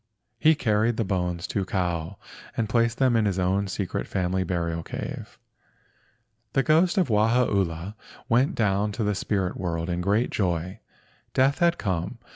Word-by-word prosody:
He 160 Hz, +4 st, +5 dB
carried 110 Hz, -3 st, +1 dB
the 115 Hz, -, +1 dB
bones 90 Hz, -3 st, -1 dB
to 100 Hz, -, -1 dB
Kau 90 Hz, -1 st, -2 dB, 0.4 s
and 110 Hz, -, 0 dB
placed 115 Hz, +1 st, +1 dB
them 130 Hz, -3 st, +3 dB
in 110 Hz, -2 st, +3 dB
his 100 Hz, -3 st, 0 dB
own 95 Hz, +2 st, +1 dB
secret 95 Hz, 0 st, -3 dB
family 95 Hz, 0 st, 0 dB
burial 85 Hz, -2 st, -2 dB
cave. -, -, -7 dB, 1.2 s
The 135 Hz, -, +3 dB
ghost 170 Hz, +6 st, +3 dB
of 180 Hz, -8 st, +2 dB
Wahaula 105 Hz, -5 st, +1 dB, 0.3 s
went 125 Hz, +3 st, +2 dB
down 105 Hz, -1 st, +1 dB
to 110 Hz, -, -2 dB
the 105 Hz, 0 st, +1 dB
spirit 95 Hz, -2 st, -1 dB
world 85 Hz, -1 st, -2 dB
in 90 Hz, 0 st, -1 dB
great 105 Hz, +6 st, +1 dB
joy. 90 Hz, -2 st, -1 dB, 0.6 s
Death 135 Hz, +2 st, +3 dB
had 170 Hz, 0 st, +3 dB
come. 95 Hz, +3 st, -2 dB
100 Hz, 155 wpm, -25 LUFS, 90-115 Hz, 1.2 s, He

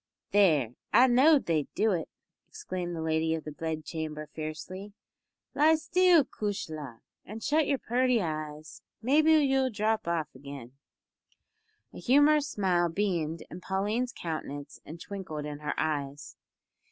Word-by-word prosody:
"There 155 Hz, -, +3 dB, 0.2 s
I 250 Hz, -, +7 dB
know'd 270 Hz, +4 st, +5 dB
they'd 155 Hz, -4 st, 0 dB
do 220 Hz, 0 st, +2 dB
it!" 170 Hz, -4 st, -2 dB, 0.4 s
exclaimed 185 Hz, -, -5 dB
the 160 Hz, -, -4 dB
lady 160 Hz, 0 st, +1 dB
of 160 Hz, -, -6 dB
the 155 Hz, -, -6 dB
bedchamber 155 Hz, 0 st, -5 dB
fiercely; 185 Hz, +6 st, -7 dB, 0.6 s
"lie 310 Hz, +3 st, +5 dB
still, 345 Hz, -1 st, +4 dB
cushla! 155 Hz, -, -5 dB, 0.2 s
an' 220 Hz, +3 st, -9 dB
shut 305 Hz, +3 st, +2 dB
your 280 Hz, -, +1 dB
purty 250 Hz, 0 st, +1 dB
eyes. 155 Hz, -3 st, -5 dB, 0.2 s
Maybe 305 Hz, +6 st, +4 dB
you'll 270 Hz, -4 st, +3 dB
drop 215 Hz, -3 st, -1 dB
off 165 Hz, -3 st, -1 dB
again!" 135 Hz, -2 st, -10 dB, 1.2 s
A -, -, -9 dB
humorous 290 Hz, +3 st, +4 dB
smile 180 Hz, -6 st, +1 dB
beamed 165 Hz, -4 st, -1 dB
in 180 Hz, -, -8 dB
Pauline's 210 Hz, +7 st, -1 dB
countenance 155 Hz, -7 st, -6 dB
and 160 Hz, +3 st, -8 dB
twinkled 170 Hz, -6 st, -6 dB
in 145 Hz, -1 st, -6 dB
her 150 Hz, 0 st, -3 dB
eyes. 145 Hz, -2 st, -3 dB
175 Hz, 135 wpm, -29 LUFS, 155-250 Hz, 1.2 s, I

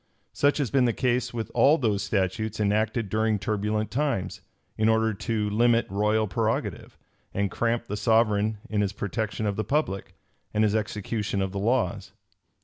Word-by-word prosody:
Such 145 Hz, 0 st, +2 dB
has 140 Hz, -7 st, -1 dB
been 135 Hz, -2 st, +4 dB
the 120 Hz, -, +2 dB
case 125 Hz, -1 st, 0 dB
with 115 Hz, -2 st, -5 dB
all 150 Hz, +4 st, +5 dB
those 110 Hz, -7 st, 0 dB
statutes 105 Hz, +2 st, -1 dB
enacted 110 Hz, +2 st, +1 dB
during 110 Hz, +1 st, +1 dB
turbulent 105 Hz, 0 st, -1 dB
times, 130 Hz, -7 st, -1 dB, 0.3 s
in 110 Hz, +1 st, +2 dB
order 110 Hz, 0 st, +2 dB
to 105 Hz, 0 st, -2 dB
limit 115 Hz, +2 st, +3 dB
royal 105 Hz, +2 st, +1 dB
prerogative, 95 Hz, -, -2 dB, 0.4 s
and 100 Hz, -1 st, 0 dB
cramp 115 Hz, 0 st, 0 dB
the 105 Hz, -, -4 dB
sovereign 110 Hz, -1 st, +2 dB
in 105 Hz, -1 st, 0 dB
his 100 Hz, -1 st, -1 dB
protection 110 Hz, +1 st, -3 dB
of 100 Hz, -1 st, -1 dB
the 110 Hz, -, 0 dB
public, 110 Hz, -5 st, -2 dB, 0.4 s
and 105 Hz, -, +3 dB
his 105 Hz, -1 st, +2 dB
execution 105 Hz, -1 st, -2 dB
of 95 Hz, -1 st, -1 dB
the 100 Hz, -, -4 dB
laws. 115 Hz, -2 st, 0 dB
110 Hz, 165 wpm, -26 LUFS, 105-115 Hz, 0.4 s, all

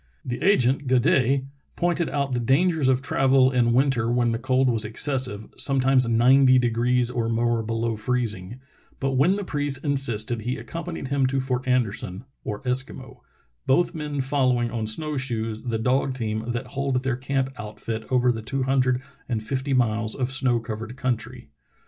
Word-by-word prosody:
The 120 Hz, 0 st, -4 dB
agent, 135 Hz, -7 st, +2 dB
Gaudet, 130 Hz, +1 st, +2 dB, 0.3 s
pointed 175 Hz, -1 st, 0 dB
out 140 Hz, -1 st, -2 dB
the 125 Hz, -, 0 dB
dangers 145 Hz, +5 st, +2 dB
of 130 Hz, 0 st, +2 dB
travel 135 Hz, -1 st, +3 dB
in 120 Hz, -2 st, +2 dB
winter 125 Hz, -2 st, +2 dB
when 120 Hz, -1 st, +2 dB
the 115 Hz, -, -2 dB
cold 130 Hz, +1 st, +1 dB
was 115 Hz, -3 st, +1 dB
excessive, 115 Hz, -1 st, 0 dB
sometimes 135 Hz, -2 st, +3 dB
ninety 130 Hz, +3 st, +5 dB
degrees 120 Hz, 0 st, +1 dB
or 115 Hz, -2 st, -1 dB
more 115 Hz, 0 st, +1 dB
below 115 Hz, +1 st, -2 dB
freezing, 110 Hz, -2 st, -3 dB, 0.4 s
but 135 Hz, 0 st, -1 dB
when 140 Hz, +9 st, +3 dB
the 205 Hz, -, -3 dB
priest 145 Hz, -5 st, -2 dB
insisted 120 Hz, -5 st, +2 dB
he 125 Hz, +4 st, -3 dB
accompanied 170 Hz, -5 st, -6 dB
him 140 Hz, -2 st, +2 dB
to 135 Hz, +1 st, -1 dB
Fort 130 Hz, -1 st, -2 dB
Anderson 115 Hz, -4 st, -1 dB, 0.2 s
(or 105 Hz, +3 st, -5 dB
Eskimo) 130 Hz, +1 st, -3 dB, 0.5 s
both 170 Hz, +6 st, +2 dB
men 150 Hz, -3 st, -3 dB
following 130 Hz, -3 st, +1 dB
on 110 Hz, -2 st, -3 dB
snow 150 Hz, +6 st, 0 dB
shoes 115 Hz, -4 st, -2 dB
the 115 Hz, -2 st, -1 dB
dog 130 Hz, +3 st, 0 dB
team 110 Hz, -1 st, -3 dB
that 120 Hz, +2 st, -3 dB
hauled 135 Hz, -2 st, -1 dB
their 130 Hz, -2 st, 0 dB
camp 135 Hz, +1 st, -2 dB
outfit 105 Hz, +1 st, -6 dB
over 125 Hz, -1 st, +3 dB
the 115 Hz, -2 st, -4 dB
two 135 Hz, +4 st, -2 dB
hun 135 Hz, +1 st, +1 dB
dred 130 Hz, 0 st, +1 dB, 0.3 s
and 110 Hz, -3 st, -2 dB
fifty 130 Hz, +4 st, -3 dB
miles 110 Hz, -3 st, +1 dB
of 130 Hz, -1 st, -2 dB
snow 130 Hz, -3 st, +2 dB
covered 115 Hz, +1 st, -7 dB
country. 125 Hz, -4 st, -4 dB
125 Hz, 170 wpm, -24 LUFS, 115-135 Hz, 0.5 s, ninety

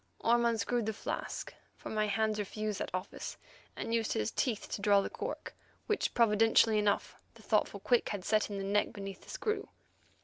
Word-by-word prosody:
Orme 235 Hz, +1 st, +4 dB
unscrewed 230 Hz, 0 st, +1 dB
the 220 Hz, -, 0 dB
flask, -, -, -4 dB, 0.2 s
for -, -, -8 dB
my 215 Hz, -1 st, +1 dB
hands 215 Hz, 0 st, +1 dB
refused 210 Hz, 0 st, -3 dB
that -, -, -2 dB
office, 185 Hz, +1 st, -5 dB, 0.4 s
and 230 Hz, -, -3 dB
used 225 Hz, -1 st, +1 dB
his 105 Hz, 0 st, 0 dB
teeth 230 Hz, -5 st, -1 dB
to -, -, -4 dB
draw 200 Hz, 0 st, +5 dB
the 195 Hz, -, -2 dB
cork, -, -, -5 dB, 0.3 s
which, 425 Hz, -, 0 dB
providentially 225 Hz, -1 st, +5 dB
enough 205 Hz, -1 st, 0 dB, 0.2 s
the 225 Hz, -, -16 dB
thoughtful 210 Hz, -2 st, +1 dB
Quick 245 Hz, +4 st, +2 dB
had 195 Hz, -3 st, -4 dB
set 215 Hz, 0 st, +2 dB
in 200 Hz, -, -4 dB
the 195 Hz, -, -3 dB
neck 205 Hz, +1 st, +1 dB
beneath 195 Hz, -2 st, -7 dB
the -, -, -16 dB
screw. 430 Hz, -1 st, -2 dB
215 Hz, 190 wpm, -32 LUFS, 200-230 Hz, 0.4 s, draw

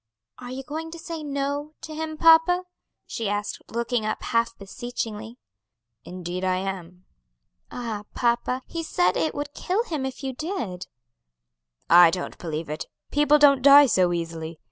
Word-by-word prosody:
"Are 245 Hz, -, -8 dB
you 260 Hz, +2 st, -6 dB
going 315 Hz, +4 st, -5 dB
to 335 Hz, -, -9 dB
say 330 Hz, -1 st, -6 dB
'No' 285 Hz, +1 st, -3 dB
to 315 Hz, -, -8 dB
him, 315 Hz, 0 st, -4 dB
papa?" 330 Hz, +3 st, +5 dB, 0.4 s
she 225 Hz, -3 st, -3 dB
asked, 205 Hz, 0 st, -3 dB
looking 235 Hz, 0 st, -1 dB
up 215 Hz, -, -3 dB
half 230 Hz, 0 st, 0 dB
beseechingly. 225 Hz, +1 st, -6 dB, 0.7 s
"Indeed 180 Hz, 0 st, -6 dB
I 185 Hz, 0 st, +2 dB
am." 185 Hz, -1 st, -6 dB, 0.6 s
"Ah, 225 Hz, -4 st, -5 dB
papa, 245 Hz, +1 st, 0 dB
he 335 Hz, -, -5 dB
said 180 Hz, -, +1 dB
it 160 Hz, -1 st, 0 dB
would 290 Hz, 0 st, -4 dB
kill 385 Hz, +8 st, -1 dB
him 315 Hz, -, -4 dB
if 265 Hz, +2 st, -5 dB
you 265 Hz, -1 st, -3 dB
did." 250 Hz, -, -4 dB, 1.0 s
"I 175 Hz, 0 st, +8 dB
don't 180 Hz, +2 st, -5 dB
believe 160 Hz, -1 st, -4 dB
it; 150 Hz, +1 st, -5 dB, 0.2 s
people 295 Hz, +1 st, +4 dB
don't 280 Hz, -2 st, +6 dB
die 285 Hz, +2 st, +9 dB
so 185 Hz, -8 st, +3 dB
easily. 165 Hz, -1 st, -4 dB
240 Hz, 155 wpm, -25 LUFS, 185-295 Hz, 1.0 s, die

